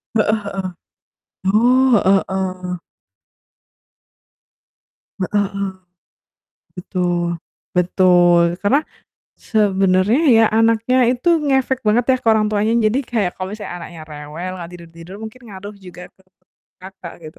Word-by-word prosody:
Heeh 215 0 +2
heeh. 195 -2 -4 0.8
Oh, 245 +6 +3
heeh 195 0 +4
heeh. 185 -1 -3 2.4
Heeh 205 +2 0
heeh. 200 0 -2 1.1
Betul, 175 -2 -2 0.3
betul, 175 -1 +3
karena 270 +9 +2 0.5
sebenarnya, 195 +1 +1 0.2
ya, 225 - +6
anaknya 225 +3 +2
itu 250 +7 0 0.2
ngefek 265 -2 +1
banget 230 +3 +3
ya - - -3
ke - - -4
orang 215 -1 +2
tuanya. 210 +1 0 0.2
Jadi 230 +5 0
kayak 215 -7 -1
kalau 185 +1 -6
misalnya 210 -4 -7
anaknya 165 -2 -10
rewel, 150 +4 -7
gak 170 - -9
tidur-tidur 170 +1 -12
mungkin 220 +3 -9
ngaruh 200 +2 -9
juga 180 -2 -12
ke - - -27 0.6
Kakak 190 -2 -10
gitu. 155 -1 -12
195 Hz, 115 wpm, -19 LUFS, 180-220 Hz, 2.4 s, ya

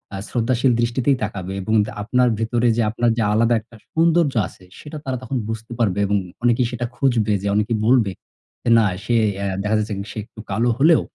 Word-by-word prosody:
আ - - -4
শ্রদ্ধাশীল 125 +2 +1
দৃষ্টিতেই 125 +3 +1
তাকাবে 95 -3 -4
এবং 110 +4 -2
দা - - -7
আপনার 125 +3 +2
ভেতরে 120 +1 +1
যে - - +3
আপনার 120 +1 +1
যে - - +1
আলাদা 115 +2 +3
একটা 115 +1 -19 0.2
সৌন্দর্য 165 -2 +3
আছে - - -17 0.2
সেটা 150 +1 -8
তারা 130 -1 -2
তখন 130 +2 -3
বুঝতে 115 +1 -6
পারবে 100 -4 +1
এবং 100 +1 +1 0.3
অনেকেই 120 0 +3
সেটা 120 0 -3
খুঁজবে 115 -6 +1
যে 100 - -3
অনেকেই 105 +2 +1
বলবে, 115 -4 +4 0.6
"এ - - +4
না 115 - +4 0.2
সে 120 - 0 0.3
এ - - -2 0.2
দেখা 105 +1 +1
যাচ্ছে 105 0 -2 0.2
সে - - -10
একটু 110 - -17
কালো 120 +2 +1
হলেও, 155 +4 +5
120 Hz, 200 wpm, -21 LUFS, 110-125 Hz, 0.6 s, হলেও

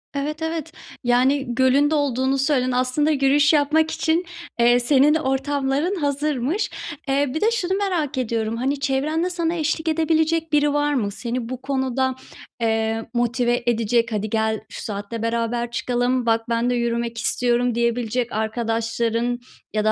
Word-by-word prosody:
Evet 300 +3 -3
evet. 320 -1 -3 0.3
Yani, 250 +1 +2
gölün 265 +3 +4
de - - +2
olduğunu 270 -2 +1
söyledin. 265 -2 +1
Aslında 255 +5 +1
yürüyüş 285 +1 +3
yapmak 310 +2 +3
için, 330 +2 0 0.3
eee, 240 +1 +5
senin 280 +4 +4
ortamların 280 +3 0
hazırmış. 290 - -1 0.4
Eee, 275 0 +1
bir 315 - -2
de 445 - +3
şunu 380 -5 -1
merak 335 -9 -1
ediyorum; 230 -2 -1
hani, 270 +3 -1
çevrende 300 +6 0
sana 340 -2 -1
eşlik 320 0 -1
edebilecek 320 0 +1
biri 295 -1 +3
var 290 0 +1
mı? 210 -7 0
Seni 235 +2 -4
bu 255 0 -5
konuda, 265 -1 -1 0.5
eee, 225 0 0
motive 240 0 +1
edecek. 230 0 +1
“Hadi 210 0 -2
gel, 220 -1 0
şu - - -8
saatte 205 +2 -5
beraber 235 +1 -1
çıkalım. 245 +1 0
Bak, 225 0 +1
ben 235 +1 +1
de 250 - +1
yürümek 235 -1 -1
istiyorum.“ 240 +1 +1
diyebilecek 235 0 0
arkadaşların 230 +2 -1 0.3
ya 215 0 0
da 215 - +4
255 Hz, 150 wpm, -22 LUFS, 235-295 Hz, 0.5 s, eee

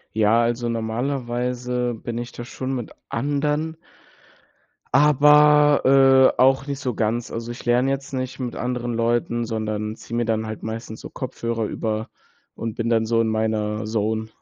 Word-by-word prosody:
Ja, 110 +2 +4
also 120 0 -1
normalerweise 125 +1 -2
bin 115 +1 -5
ich 120 0 -6
da 120 - -7
schon 130 +2 -4
mit 120 -4 -5 0.2
anderen 150 +5 -1 1.2
aber, 145 -2 +6
äh, - - -28
auch 135 +1 +4
nicht 140 -1 -3
so 125 -3 -3
ganz. 115 +2 -1
Also, 115 +1 -5
ich 120 - -8
lerne 125 +2 +2
jetzt 135 0 -3
nicht 130 -1 -4
mit 125 -3 -4
anderen 125 -1 -2
Leuten, 120 0 0
sondern 110 -1 -3
ziehe 115 - -9
mir 120 -1 0
dann 110 -1 0
halt 110 -1 -6
meistens 110 0 -6
so - - -8
Kopfhörer 115 -3 -4
über 110 +1 -3 0.4
und 115 -1 -5
bin 115 +1 -2
dann 115 -1 +2
so 115 0 +2
in 115 - 0
meiner 110 -1 -1
Zone. 110 0 -1
120 Hz, 160 wpm, -23 LUFS, 110-130 Hz, 1.2 s, aber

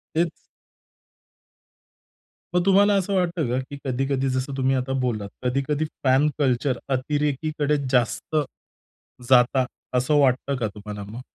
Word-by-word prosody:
तेच. 170 +1 +2 2.2
मग 180 0 +2
तुम्हाला 200 +1 +5
असं 195 0 0
वाटतं 175 -6 0
का, 125 +2 0
की 135 +2 -7
कधी-कधी 135 +1 0
जसं 130 +2 -2
तुम्ही 135 0 +2
आता 130 +1 -1
बोललात, 110 -5 -2
कधी-कधी 140 +4 0 0.2
फॅन 135 +2 +4
कल्चर 130 -2 +1 0.2
अतिरेकीकडे 150 +2 0
जास्त, 125 +5 0 0.9
जाता 125 0 +5 0.3
असं 130 +5 +2
वाटतं 135 0 +2
का 115 -3 -1
तुम्हाला 105 0 -7
मग? 120 +4 -7
135 Hz, 120 wpm, -24 LUFS, 125-150 Hz, 2.2 s, तुम्हाला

